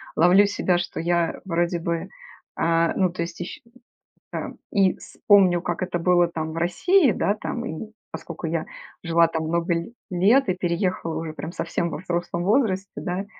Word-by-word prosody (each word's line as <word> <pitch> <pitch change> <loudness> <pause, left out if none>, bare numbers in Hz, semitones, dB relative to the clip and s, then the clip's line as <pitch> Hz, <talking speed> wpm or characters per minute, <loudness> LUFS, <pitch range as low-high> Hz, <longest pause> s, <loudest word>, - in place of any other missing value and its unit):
ловлю 180 +5 +6
себя, 190 -3 +1
что 175 - -4
я 170 0 0
вроде 170 -1 0
бы, 170 0 -3 0.5
а, 165 0 +2
ну, 185 -3 +2
то 170 -1 -5
есть, 170 0 -5
еще 175 - -6 0.7
там - - -5
и 195 -3 +3
с - - -14
помню, 190 -4 +6
как 175 0 -3
это 180 -1 -2
было 175 0 +4
там 160 -2 -4
в - - -7
России, 260 - +3
да, 200 - +1
там 235 +2 -4
и 215 +3 -6 0.2
поскольку 170 0 -7
я 165 0 -1 0.4
жила 170 0 +4
там 160 -1 -3
много 170 +2 0
ле 170 +7 -3 0.2
лет 210 +10 +4
и - - +3
переехала 175 -2 -1
уже 160 -1 -5
прям 160 +1 -6
совсем 170 0 -2
во - - -4
взрослом 175 -1 -2
возрасте, 200 -3 +1
да, 180 +3 -3
175 Hz, 180 wpm, -24 LUFS, 170-190 Hz, 0.7 s, ловлю